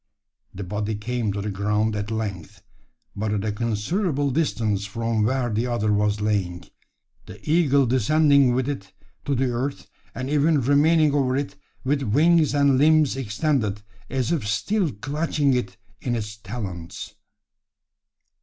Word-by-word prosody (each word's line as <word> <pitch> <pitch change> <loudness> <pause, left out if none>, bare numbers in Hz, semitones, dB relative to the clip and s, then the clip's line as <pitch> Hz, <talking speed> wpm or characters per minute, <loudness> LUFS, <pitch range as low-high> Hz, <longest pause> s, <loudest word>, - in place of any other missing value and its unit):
The 100 - -5
body 105 +3 -3
came 115 0 -2
to 100 0 -3
the 105 - -3
ground 105 +2 0
at 105 0 -3
length 105 -7 -5 0.5
but 105 +1 -2
at 105 0 -1
a 110 - 0
considerable 135 - -1
distance 115 -9 0
from 115 +1 -1
where 125 0 0
the 115 +4 0
other 110 -3 0
was 105 0 +1
lying 95 -5 -1 0.6
the - - -10
eagle 145 -4 +3
descending 135 +2 +4
with 130 0 0
it 95 -10 -5 0.3
to 140 - 0
the 130 0 0
earth, 130 +4 -3 0.3
and 130 - -4
even 150 +2 +3
remaining 145 +3 +3
over 130 -3 +1
it 140 0 -3 0.3
with 140 +2 0
wings 150 +6 +3
and 140 -2 +4
limbs 155 -2 +4
extended, 115 -3 -1 0.3
as 130 -3 -1
if 150 -11 -1
still 165 - 0
clutching 145 +4 0
it 125 -1 -2 0.2
in 120 -2 -1
his 105 -2 -4
talons! 100 -6 -7
120 Hz, 145 wpm, -24 LUFS, 105-140 Hz, 0.6 s, descending